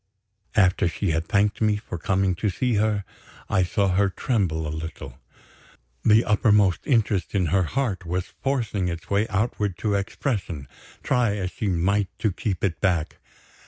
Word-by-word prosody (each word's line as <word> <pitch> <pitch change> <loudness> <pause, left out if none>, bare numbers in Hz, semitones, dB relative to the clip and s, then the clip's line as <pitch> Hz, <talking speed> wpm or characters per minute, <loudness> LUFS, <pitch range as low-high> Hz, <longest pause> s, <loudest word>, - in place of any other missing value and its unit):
After 90 -4 +4
she 80 - -1
had 80 +1 -1
thanked 100 +2 +1
me 110 -1 +3
for 95 -5 -7
coming 95 +2 +1
to 105 +3 0
see 125 +7 0
her, 105 -2 +1 0.5
I 95 - +3
saw 95 +2 +1
her 100 +2 +2
tremble 95 -7 -1
a 75 - -3
little. 80 +1 -7 0.8
The 110 +2 +5
uppermost 105 -3 +3
interest 105 -7 +1
in 95 -2 +2
her 95 - +4
heart 110 - -2
was 90 +2 -3
forcing 115 -9 0
its 85 +1 -6
way 100 +2 +2
outward 105 -3 -1
to 105 +1 -1
expression, 100 - -2 0.4
try 120 -5 +2
as 95 -3 -3
she 110 -5 -3
might 95 +3 +1
to 110 - 0
keep 95 0 -3
it 90 -5 -1
back. 90 -5 0
100 Hz, 160 wpm, -24 LUFS, 90-105 Hz, 0.8 s, The